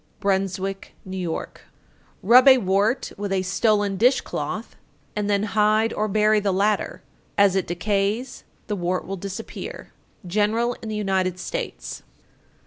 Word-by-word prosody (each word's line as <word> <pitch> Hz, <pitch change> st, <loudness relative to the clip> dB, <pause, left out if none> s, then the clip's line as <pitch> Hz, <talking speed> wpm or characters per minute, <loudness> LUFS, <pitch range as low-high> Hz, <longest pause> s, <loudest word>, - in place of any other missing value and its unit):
Bruynswick, 195 Hz, 0 st, -2 dB
N.Y. 190 Hz, 0 st, -5 dB
898[TN 160 Hz, -, -2 dB
7] -, -, -21 dB, 0.6 s
Rub 250 Hz, +7 st, +7 dB
a 260 Hz, -1 st, +9 dB
wart 205 Hz, +3 st, +1 dB
with 205 Hz, -1 st, -4 dB
a 190 Hz, -1 st, +1 dB
stolen 205 Hz, 0 st, +1 dB
dish 245 Hz, +6 st, +4 dB
cloth, -, -, -5 dB, 0.4 s
and 210 Hz, -1 st, -1 dB
then 200 Hz, 0 st, +2 dB
hide 215 Hz, +1 st, +2 dB
or 215 Hz, -, -1 dB
bury 215 Hz, +1 st, +3 dB
the 200 Hz, -1 st, 0 dB
latter. 200 Hz, +2 st, 0 dB, 0.3 s
As 200 Hz, -2 st, +5 dB
it 190 Hz, -, 0 dB
decays, 200 Hz, +7 st, -1 dB, 0.2 s
the 210 Hz, -, -2 dB
wart 180 Hz, 0 st, -2 dB
will 195 Hz, -, -4 dB
disappear. 200 Hz, +4 st, -7 dB, 0.3 s
_General 215 Hz, +6 st, +1 dB
in 225 Hz, -, -6 dB
the 215 Hz, -, -3 dB
United 190 Hz, -3 st, 0 dB
States. -, -, -5 dB
205 Hz, 145 wpm, -23 LUFS, 190-215 Hz, 0.6 s, a